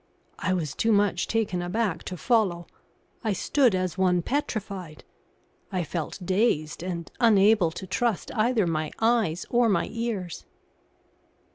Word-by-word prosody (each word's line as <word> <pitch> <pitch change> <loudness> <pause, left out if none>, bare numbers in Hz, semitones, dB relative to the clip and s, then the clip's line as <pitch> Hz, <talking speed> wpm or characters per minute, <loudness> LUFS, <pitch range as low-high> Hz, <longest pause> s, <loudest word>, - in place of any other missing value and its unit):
I - - -1
was 160 -7 -2
too 225 - +1
much 200 -4 +2
taken 215 -6 0
aback 180 -1 -1
to 180 - -5
follow. 195 -6 +1 0.6
I 220 -3 +1
stood 250 +2 +2
as 185 0 -2
one 180 -2 +3
petrified. 200 - -3 0.7
I 185 -2 -1
felt 160 0 -4
dazed 185 -6 +1
and 170 -2 -5
unable 210 -5 +5
to 180 +4 -7
trust 215 +3 -1
either 225 -1 +2
my 155 -2 -1
eyes 225 -7 +1
or 240 -1 +4
my 200 - +1
ears. 225 -7 -4
190 Hz, 135 wpm, -26 LUFS, 175-225 Hz, 0.7 s, unable